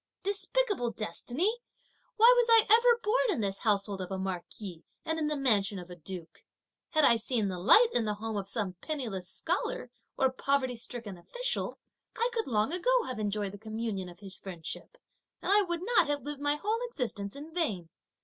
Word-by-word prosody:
Despicable 405 - 0
destiny! 245 - -1 0.6
why 465 +3 +8
was 485 -1 +4
I 455 -1 +7
ever 470 +1 +6
born 480 +3 +2
in 350 - +1
this 195 -1 0
household 200 -2 +1
of 180 - -5
a 190 - -3
marquis 190 -1 -5 0.2
and 320 0 -1
in 305 - 0
the 300 - 0
mansion 210 -7 +2
of 180 0 -9
a - - -7
duke? 175 0 -9 0.5
Had 310 -2 +4
I 235 - +6
seen 225 -2 0
the 180 -1 -4
light 440 - +7
in 235 - +2
the 210 -1 -1
home 220 +1 -4
of 200 -1 -3
some 200 -4 -1
penniless 225 - -4
scholar, 350 +4 -2 0.3
or 265 -1 +3
poverty 260 -1 0
stricken 230 -5 -7
official, - - -2 0.4
I 470 +2 +1
could 455 -2 -1
long 220 +4 +1
ago - - +2
have 255 -3 -5
enjoyed 205 -1 -1
the 205 - -10
communion 220 -3 -4
of 175 +3 -14
his 195 -2 -6
friendship, 185 - -8 0.4
and - - -1
I 415 +1 +6
would 345 -3 -2
not 470 -4 +4
have 290 0 -1
lived 290 -1 -5
my 290 0 +2
whole 425 +9 -1
existence 205 - -4
in 300 +3 -9
vain! 205 - -1
240 Hz, 190 wpm, -30 LUFS, -, 0.6 s, why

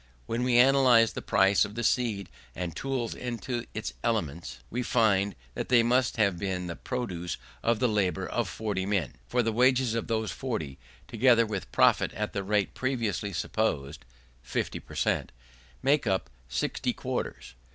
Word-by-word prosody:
When 115 - -2
we 125 -1 +3
analyse 125 -3 +6
the - - -5
price 100 -1 +4
of 105 - -5
the 120 - -2
seed 110 -6 0 0.3
and 85 -3 -4
tools 130 -4 -2
into 120 0 -4
its 110 +1 -4
elements, 85 - -2
we 125 - -1
find 100 -5 +2 0.2
that - - -4
they 120 -2 +6
must 125 +1 +2
have 100 -5 +2
been 95 -2 -2
the 85 -1 -5
produce 95 -9 -4 0.2
of 115 -1 +2
the 125 - +2
labour 95 -4 0
of 120 -5 -1
40 100 -2 -3
men: 100 -9 -1
for 125 0 +1
the 115 - +1
wages 125 0 +3
of 115 - -2
those 110 -1 -1
40, 80 - -4 0.3
together 120 -3 +4
with 105 -3 -5
profit - - +4
at 105 +1 -3
the 100 - -1
rate 105 0 0
previously 115 -7 -1
supposed 80 -6 -2 0.4
(50 - - -3
per - - -13
cent) - - 0 0.5
make 140 -2 +3
up 95 -2 0 0.2
60 - - -1
quarters. - - -4
110 Hz, 165 wpm, -28 LUFS, 95-120 Hz, 0.5 s, analyse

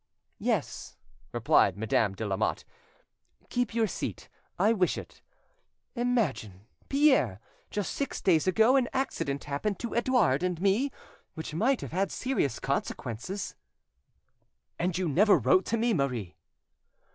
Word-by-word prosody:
"Yes," - - -2 0.3
replied 95 -1 +3
Madame 105 -2 +1
de 110 - -4
Lamotte, 95 -2 -1 0.8
"keep 245 -2 -1
your 230 -1 +3
seat, - - -5 0.3
I 215 +2 +4
wish 185 -5 +1
it. - - -10 0.7
Imagine, 210 - -1 0.3
Pierre, 265 - +3 0.3
just 205 -2 -3
six 280 - -3
days 170 -2 +2
ago, 220 +7 +4
an 250 -3 +1
accident 145 - -2
happened 145 +9 -2
to 235 - -5
Edouard 235 - +2
and 180 -2 -1
me 200 +9 +2 0.5
which 160 -2 -6
might 240 - +1
have - - -6
had 190 +3 0
serious 255 - -1
consequences." 140 - -3 1.3
"And 175 0 0
you 185 -1 0
never 200 +8 +5
wrote 185 - +3
to 230 - 0
me, 230 +1 +2
Marie?" 125 - -2
185 Hz, 130 wpm, -29 LUFS, -, 1.3 s, never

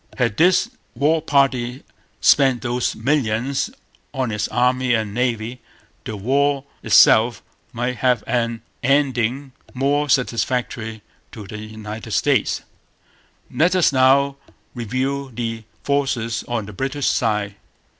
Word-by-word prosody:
Had 120 -4 0
this 180 +5 +4 0.3
'war 155 +6 +2
party' 135 -4 +1 0.4
spent 135 -4 +4
those 120 -1 -1
millions 130 0 0 0.5
on 130 -3 -1
its 105 -1 -1
Army 125 +1 +2
and 110 -2 -2
Navy, 120 0 -2 0.4
the 110 - -5
war 140 +6 +1 0.2
itself 115 0 +5 0.3
might 125 +1 -3
have 125 -3 +2
had - - -1
an 115 -1 -4 0.2
ending 135 -1 +1 0.2
more 145 +3 +1
satisfactory 115 -3 -1 0.3
to 105 -3 -8
the 105 +1 -8
United 110 0 -8
States. - - +1 0.9
Let 175 +4 +2
us 175 -6 +3
now 135 +1 +4 0.4
review 130 +4 -2
the 115 -1 -4 0.2
forces 130 -5 -1
on 120 -3 -2
the 105 - -10
British 135 +5 -3
side. 105 -3 0
125 Hz, 120 wpm, -21 LUFS, 115-135 Hz, 0.9 s, itself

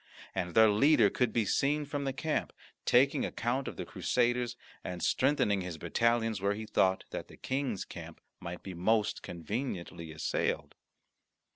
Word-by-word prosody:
And 90 -2 -3
their 110 -1 +7
leader 115 -1 +5
could 125 -3 +1
be 115 -1 +1
seen 145 +8 +1
from 145 0 -3
the 135 - 0
camp, 155 +4 -2 0.3
taking 130 +3 +4
account 125 +4 -1
of - - -6
the - - -4
Crusaders, 120 -1 0 0.3
and 90 -2 -5
strengthening 130 -8 +2
his 90 -3 -5
battalions 115 +2 +1
where 100 +1 +1
he 110 +1 -5
thought 95 -3 +2
that - - -5
the - - -14
King's 130 -6 -2
camp - - -9 0.2
might 85 +1 -7
be 95 - -6
most 105 +5 +1
conveniently 85 - -5
assailed. 80 0 -1
110 Hz, 155 wpm, -31 LUFS, 95-130 Hz, 0.3 s, their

